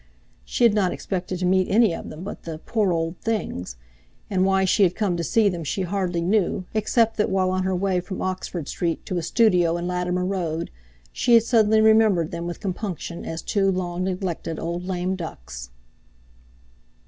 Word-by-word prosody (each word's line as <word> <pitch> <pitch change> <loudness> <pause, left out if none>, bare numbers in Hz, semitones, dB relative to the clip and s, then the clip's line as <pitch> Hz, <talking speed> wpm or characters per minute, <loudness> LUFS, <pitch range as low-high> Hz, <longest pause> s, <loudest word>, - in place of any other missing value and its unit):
She 150 - -1
had 230 -3 +6
not 200 -4 +2
expected 185 -1 -3
to 180 - -2
meet 185 0 +2
any 215 -3 +4
of - - -6
them 155 +3 -8
but 200 - -7
"the 165 -2 -6
poor 205 +3 0
old 165 +1 -2
things"; 165 - -3 0.6
and 185 -1 +2
why 190 0 +3
she 195 +3 +2
had 180 -2 +4
come 205 -5 0
to 170 - -2
see 220 +5 +3
them 175 -4 -2
she 185 +6 -2
hardly 180 -2 -1
knew, 185 0 +1
except 225 +1 +2
that, 210 - +1
while 190 -1 +1
on 185 0 0
her 190 0 0
way 185 0 +1
from 185 +2 -6
Oxford 185 -4 -3
Street 170 -2 -2
to 180 - -2
a - - -3
studio 175 -3 +3
in 175 - -4
Latimer 180 0 -1
Road, 170 -4 -2 0.4
she 240 - +4
had 230 - +6
suddenly 220 -2 +4
remembered 220 -7 +4
them 170 0 -4
with 175 - -5
compunction 185 -3 -4
as 165 0 -5
two 195 -2 +1
long 180 -1 -2
neglected 180 -3 -3
old 170 +2 -3
lame 185 0 -1
ducks. - - -8
185 Hz, 190 wpm, -24 LUFS, 170-200 Hz, 0.6 s, had